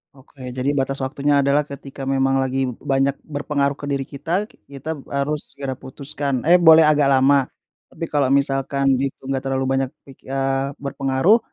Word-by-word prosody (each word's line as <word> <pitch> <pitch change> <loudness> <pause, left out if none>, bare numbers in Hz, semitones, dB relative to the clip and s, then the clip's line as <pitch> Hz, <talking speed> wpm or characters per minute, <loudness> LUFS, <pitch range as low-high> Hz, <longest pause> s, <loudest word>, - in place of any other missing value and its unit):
Oke, 135 0 -18 0.2
jadi 130 +2 0
batas 135 -1 -1
waktunya 140 +2 0
adalah 140 +2 +3
ketika 140 0 -9
memang 135 0 +2
lagi 130 0 0 0.3
banyak 135 +1 +2
berpengaruh 145 -1 -2
ke - - -7
diri 140 -1 0
kita, 170 +9 -2 0.2
kita 140 +3 -6
harus 140 +2 -3
segera 135 -2 -5
putuskan, 140 0 -3
eh, 175 - +8
boleh 160 -2 +7
agak 150 -2 +4
lama. 135 +1 +4 0.4
Tapi 165 - -5
kalau 145 -2 +2
misalkan 140 0 +1
itu 135 +1 -3
enggak 135 -1 -1
terlalu 135 0 -1
banyak 135 -1 0 0.2
ki 135 - -16
eee 135 +1 -1
berpengaruh, 140 - +2
140 Hz, 160 wpm, -21 LUFS, 135-145 Hz, 0.4 s, eh